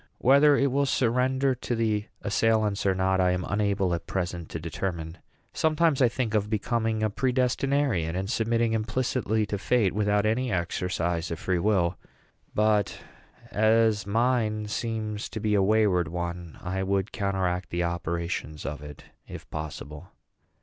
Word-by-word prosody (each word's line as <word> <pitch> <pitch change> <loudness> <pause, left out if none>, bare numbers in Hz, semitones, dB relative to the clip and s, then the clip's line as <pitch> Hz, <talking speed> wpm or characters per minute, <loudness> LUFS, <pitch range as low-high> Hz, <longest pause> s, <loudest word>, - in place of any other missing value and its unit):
Whether 140 +3 +5
it 140 -1 +2
will 140 +1 +1
surrender 130 +2 +2
to 125 -1 -3
the 110 -2 0 0.2
assailants 105 -1 +1
or 95 - +3
not 95 0 +2
I 90 0 +3
am 90 0 -2
unable 100 -3 +1
at 85 -1 -4
present 85 -3 -3
to 80 - -5
determine. 85 0 -4 0.3
Sometimes 160 -2 +2
I 125 - +5
think 115 -2 -2
of 105 -1 +1
becoming 110 0 0
a 110 - +2
predestinarian, 125 - +1
and 95 +1 -2
submitting 115 +1 +1
implicitly 110 -1 0
to 100 -1 -3
fate, 110 -3 +2
without 105 0 +1
any 120 +3 0
exercise 85 -1 -1
of 85 - -3
free 90 +2 -1
will; 90 -3 +1 0.6
but, 105 -1 +2 0.5
as 110 -1 +3
mine 110 -1 +1
seems 110 0 -3
to 110 - -5
be 105 0 0
a 100 - +4
wayward 100 -4 +3
one, 85 0 -5
I 95 +1 -2
would 95 +2 0
counteract 95 -3 -1
the 85 0 -1
operations 85 -2 -3
of 75 0 -4
it, 75 -1 -10 0.2
if - - -9
possible. 75 +2 -7
105 Hz, 150 wpm, -27 LUFS, 90-115 Hz, 0.6 s, Whether